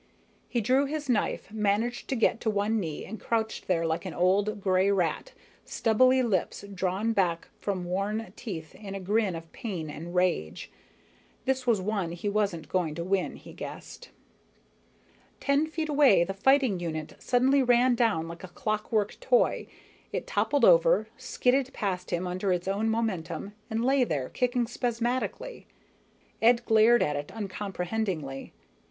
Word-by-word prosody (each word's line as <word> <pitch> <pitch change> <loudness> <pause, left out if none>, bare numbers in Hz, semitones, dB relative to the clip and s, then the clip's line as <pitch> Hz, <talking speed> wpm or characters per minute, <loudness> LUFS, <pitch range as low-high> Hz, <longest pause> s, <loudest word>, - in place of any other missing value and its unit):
He 240 - 0
drew 260 +6 +3
his 300 0 -4
knife, 225 -2 0
managed 220 +3 0
to 270 - -1
get 230 0 +2
to 225 - 0
one 210 +2 +1
knee, 160 -6 -4
and 220 +3 -7
crouched 225 -1 -2
there 165 -3 +1
like 160 0 -1
an 185 -4 -6
old 200 +4 +2
gray 190 0 +2
rat, 195 - 0 0.3
stubbly 255 +3 +3
lips 200 -2 -1
drawn 190 +4 0
back 175 -5 0
from 190 -3 -2
worn 195 +2 -2
teeth 165 -9 -7
in 200 -2 -8
a - - -4
grin 200 0 0
of 165 0 -9
pain 180 - -5
and 170 +4 -8
rage. 180 - 0 0.7
This 260 -1 0
was 230 -4 +4
one 195 -4 -2
he 175 +4 -5
wasn't 200 -7 -1
going 160 -2 -1
to 170 - -3
win, 190 +1 0
he - - -12
guessed. - - -9 1.3
Ten 280 +2 +2
feet 315 0 -3
away, 285 - +5
the 195 - -3
fighting 260 -1 +3
unit 155 -3 -4
suddenly 260 +3 +3
ran 245 0 +4
down 225 -9 +1
like 170 +2 -9
a - - -6
clockwork 215 +2 -1
toy. - - +2 0.4
It - - -3
toppled 285 -1 +2
over, - - +5
skidded 260 +1 0
past 185 -3 -3
him 175 +1 -1
under 185 +2 -1
its 180 0 -1
own 205 +3 0
momentum, 200 -5 -2 0.2
and 225 +1 -1
lay 270 0 +4
there 145 - -2
kicking 245 -1 0
spasmodically. 245 - -3 0.7
Ed 235 +1 +4
glared 225 +2 +5
at 150 - -1
it 145 0 -5
uncomprehendingly. 190 -7 -4
205 Hz, 155 wpm, -28 LUFS, 180-240 Hz, 1.3 s, away